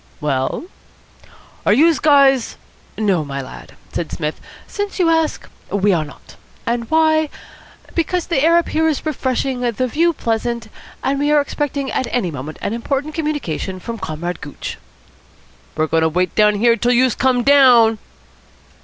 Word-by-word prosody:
"Well?" 135 - -1 1.0
"Are - - +3
youse 315 +6 +4
guys 275 -4 +4 0.2
?" - - -31
"No, 195 -7 +1
my 140 -1 -5
lad," 130 - -10 0.2
said 170 - -3
Psmith, 150 -1 -4 0.2
"since 410 0 -4
you 355 -3 +3
ask, 325 -1 0 0.2
we 200 0 +2
are 165 -3 +1
not. 145 - -14 0.3
And 235 -1 -2
why? 315 -1 +3 0.6
Because 345 +1 -1
the 315 -6 0
air 335 +2 +5
up 340 - 0
here 320 +1 +1
is 310 -1 -1
refreshing, 260 -3 -1
the 245 0 -1
view 335 +7 +2
pleasant, 230 -2 -2 0.3
and 275 +1 0
we 290 +1 +1
are 300 - +5
expecting 285 -1 -2
at 260 - -1
any 205 -9 -1
moment 145 +2 -7
an - - -1
important 275 +6 -2
communication 290 - -3
from 230 +4 -6
Comrade 175 0 -5
Gooch." 145 - -7 1.0
"We're 155 - +2
goin' 160 +1 +1
to 160 - +3
wait 180 +1 0
here 210 +2 +4
till 240 +2 +1
youse 250 0 +3
come 255 -2 +1
down." 245 -6 +6
245 Hz, 160 wpm, -19 LUFS, 185-295 Hz, 1.0 s, down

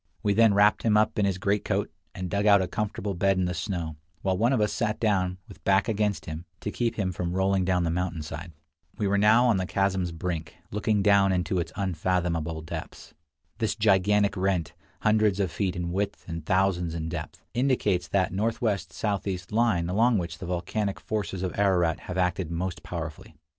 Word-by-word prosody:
We 100 - +2
then 110 -1 +5
wrapped 105 +1 +4
him 105 -2 +3
up 110 0 +2
in 100 - +3
his 95 -2 0
greatcoat, 100 +2 0 0.2
and 90 - -4
dug 100 +3 0
out 100 -1 +7
a 95 - 0
comfortable 105 -1 -3
bed 95 +2 +2
in 95 - +1
the 90 - -1
snow, 85 -3 -3 0.3
while 95 -1 +1
one 115 +6 +2
of 130 - +2
us 105 0 +1
sat 110 -2 -1
down, 95 -5 +1
with 100 - -14
back 100 +2 +3
against 105 -2 0
him, 80 +2 -6 0.2
to 105 - -3
keep 120 0 -1
him 95 -4 -1
from 85 -1 -3
rolling 95 0 +2
down 90 -1 +2
the 85 - 0
mountain 85 -2 -2
side. 80 +3 -7 0.5
We 105 - 0
were 100 +1 +2
now 110 +4 +5
on 115 -5 +4
the 95 -1 -2
chasm's 95 -3 0
brink, 80 -1 -4 0.2
looking 105 0 +1
down 100 -1 +5
into 90 0 0
its 85 -1 -3
unfathomable 85 -4 -1
depths. 80 - -8 0.5
This 110 - 0
gigantic 105 -1 +3
rent, 95 -5 0 0.3
hundreds 105 -2 +3
of 95 -4 0
feet 95 -1 -1
in 85 -1 -3
width 100 +2 -3
and 85 -2 -5
thousands 90 -1 +1
in 80 -1 -3
depth, 80 -2 -6
indicates 110 -9 +1
that 95 -2 +1
northwest 110 0 -1
southeast 95 -4 -3
line 105 -6 +2
along 110 +6 +3
which 85 -2 -4
the 95 - -6
volcanic 95 +3 -2
forces 100 -3 -3
of 90 - -2
Ararat 90 -5 +2
have 90 - -3
acted 90 -2 0
most 85 +2 -3
powerfully. 80 -3 -7
95 Hz, 195 wpm, -27 LUFS, 90-105 Hz, 0.5 s, out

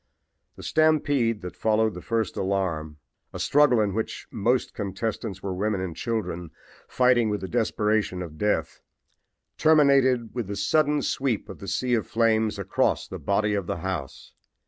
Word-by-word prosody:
"The - - -11
stampede 145 -8 +2
that 90 - -7
followed 110 0 +1
the 90 - -8
first 115 -2 -1
alarm, 90 -6 -2 0.4
a - - -5
struggle 145 -5 +4
in 105 -2 +1
which 110 +2 -4
most 120 +4 0
contestants 100 0 -4
were 95 -1 -2
women 100 +2 -1
and 90 -3 -4
children, 90 -6 -3 0.4
fighting 125 -3 +3
with 105 -1 -2
the 95 - -4
desperation 105 -4 0
of 80 -3 -10
death, 105 0 -1 0.8
terminated 135 -6 +4
with 120 -5 -3
the 100 - -4
sudden 150 +8 +2
sweep 130 -5 -1
of - - -9
the 100 - -9
sea 125 +6 -1
of 115 -3 +1
flames 110 -2 +1
across 100 -1 0
the - - -7
body 105 +1 +1
of 100 -3 -2
the - - -2
house. 85 -5 -5
110 Hz, 160 wpm, -25 LUFS, 95-120 Hz, 0.8 s, struggle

